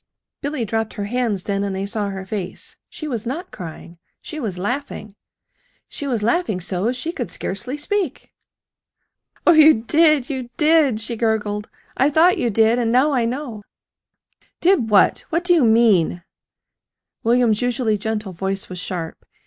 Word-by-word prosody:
Billy 285 -4 -2
dropped 225 +1 -2
her 205 - -3
hands 215 -3 -1
then, 200 -1 -1
and 200 -1 -2
they 195 +1 -2
saw 205 0 -2
her 190 -1 -6
face. 190 -3 -6
She 310 - -7
was 235 -6 -3
not 315 +9 -5
crying. 170 -1 -9 0.2
She 320 -3 -7
was 210 -9 -4
laughing. 215 0 -4 0.7
She 285 - -6
was 235 -6 -1
laughing 235 - +1
so 185 +5 -1
she 255 +6 -4
could 370 - -5
scarcely 245 +9 -4
speak. 360 +1 -3 1.1
"Oh, - - +7
you 315 -1 +7
did, 295 +4 +3
you 260 -4 -5
did!" 305 -7 +3
she 225 +1 -4
gurgled. 215 -2 -1 0.3
"I 270 - +3
thought 325 +5 +4
you 240 - +1
did, 225 +2 +3
and 230 -2 0
now 260 +5 +4
I 250 -4 +1
know!" 240 -3 -4 1.0
"Did 345 - +3
what? 205 -2 +4
What 335 +2 0
do 355 0 +3
you 325 -5 +4
mean?" 220 -7 +3 1.0
William's 230 -2 +2
usually 245 -4 0
gentle 215 -2 -3
voice 195 +2 -3
was 180 -1 -6
sharp. 175 -3 -5
230 Hz, 160 wpm, -21 LUFS, 205-285 Hz, 1.1 s, Oh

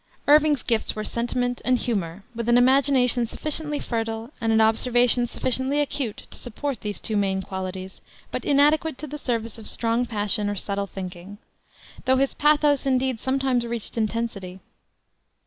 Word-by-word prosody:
Irving's 300 -1 +5
gifts 230 -2 -1
were 215 - -3
sentiment 245 +2 -2
and 255 0 +3
humor, 195 -7 -3
with 235 0 -3
an 240 - +6
imagination 255 -2 +4
sufficiently 300 +3 -2
fertile, 225 +1 -3
and 225 -1 +1
an 220 - +4
observation 240 +2 +3
sufficiently 260 +4 0
acute 275 -6 -2
to - - -5
support 255 +1 -4
those 210 -1 -3
two 220 - -3
main 195 -2 0
qualities, 190 0 -6 0.3
but - - -3
inadequate 295 +1 +3
to 305 - -6
the 295 0 -7
service 230 -4 -3
of 215 - -4
strong 235 +1 0
passion 205 -2 -1
or 205 - -2
subtle 200 0 -2
thinking, 185 +1 -8 0.7
though 260 0 +4
his 275 +1 +1
pathos, 295 -2 +3
indeed, 260 -2 +1
sometimes 265 -2 +1
reached 235 -2 -4
intensity. 215 -4 -3
240 Hz, 155 wpm, -24 LUFS, 215-265 Hz, 0.7 s, an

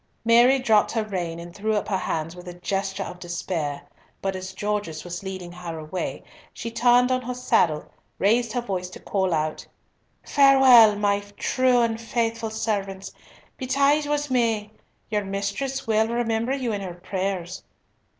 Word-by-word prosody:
Mary 240 +3 +6
dropped 225 -5 +3
her 225 -1 0
rein 180 -5 -4
and 170 0 -9
threw 215 +2 -1
up 210 - -1
her 200 - 0
hands 165 -2 -3
with 180 0 -11
a 175 - -7
gesture 195 +2 -2
of 180 - -8
despair, 170 -4 -3 0.4
but 195 -1 -2
as 185 0 -6
Gorges 205 -6 -3
was 175 0 -6
leading 185 -2 -6
her 175 -2 -7
away, 155 +4 -5 0.3
she 230 - -6
turned 245 +2 +4
on 255 0 +1
her 250 0 -5
saddle, 165 -10 +2
and - - -22 0.3
raised 230 +4 +2
her 245 - 0
voice 185 -6 -3
to - - -11
call 190 -2 -1
out, 155 -1 -2 0.6
"Farewell, 265 -6 +7
my 205 0 +1 0.2
true 255 -1 +2
and 225 -1 -1
faithful 230 -1 -1
servants! 200 -3 -3 0.5
Betide 280 +3 +2
what 295 -1 -1
may, 225 -4 +1 0.4
your 210 -1 0
mistress 200 +8 -3
will 220 0 +2
remember 235 +2 0
you 255 -4 -2
in 205 - -3
her 180 -3 -6
prayers. 185 -1 -4
210 Hz, 165 wpm, -24 LUFS, 185-240 Hz, 0.6 s, Farewell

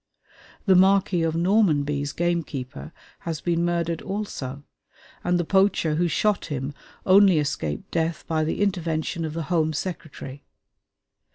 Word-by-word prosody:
The 195 - +5
Marquis 190 -1 +4
of 165 -1 0
Normanby's 150 -7 +2
gamekeeper 155 -5 -3 0.3
has 165 -2 -4
been 170 0 0
murdered 170 -1 -1
also, 145 -10 -5 0.6
and 175 0 +1
the 175 - 0
poacher 190 -4 +2
who 175 +3 +1
shot 205 +6 +1
him 140 -2 -4 0.3
only 190 -2 +6
escaped 110 - -2
death 165 -1 -1
by 160 -1 0
the 160 +6 0
intervention 170 -4 -1
of 155 - -4
the 165 0 -3
Home 160 -2 +2
Secretary. 145 -4 -6
165 Hz, 130 wpm, -24 LUFS, 150-180 Hz, 0.6 s, only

